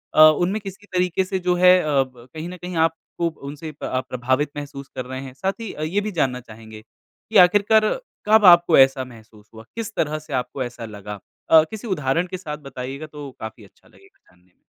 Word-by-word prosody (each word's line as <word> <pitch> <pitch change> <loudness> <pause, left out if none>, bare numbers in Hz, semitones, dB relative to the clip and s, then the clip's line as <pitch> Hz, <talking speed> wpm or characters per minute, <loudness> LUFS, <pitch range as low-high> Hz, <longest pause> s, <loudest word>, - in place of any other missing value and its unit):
अ, - - +7
उनमें 175 +7 +5
किसी 195 +1 -9
तरीके 180 0 +1
से 190 0 -2
जो 180 0 +1
है 180 +1 +6
अ, 155 - -4 0.2
ब 125 -2 -17
कहीं 160 +2 -6
न 180 - -8
कहीं 180 0 -7
आपको 165 +1 -5 0.2
उनसे 150 +2 -7
प 150 - -15
आप 130 0 -2
प्रभावित 130 +4 0
महसूस 140 -1 -7
कर 130 - -4
रहे 130 +1 -6
हैं? 135 -1 -9
साथ 190 +8 -2
ही 225 - -5
अ, - - -8
ये 180 +7 0
भी 210 +1 -4
जानना 135 -8 0
चाहेंगे 110 -2 -12 0.5
कि 220 - +3
आखिरकार 205 +4 +4 0.4
कब 215 0 +6
आपको 175 -2 +7
ऐसा 135 0 +5
महसूस 110 -3 -16
हुआ? 110 0 -11
किस 225 -1 -4
तरह 155 0 0
से 155 -1 -11
आपको 130 +1 -2
ऐसा 120 -2 -7
लगा? 105 -1 -8 0.3
अ, 160 -1 +8
किसी 220 +2 -7
उदाहरण 165 -2 0
के 185 +1 -5
साथ 155 -5 -6
बताइएगा 135 +1 -7
तो 150 -2 -9
काफ़ी 110 0 -8
अच्छा 100 - -21
लगेगा - - -23
जानने 90 +1 -28
में। - - -46
150 Hz, 215 wpm, -22 LUFS, 130-180 Hz, 0.5 s, अ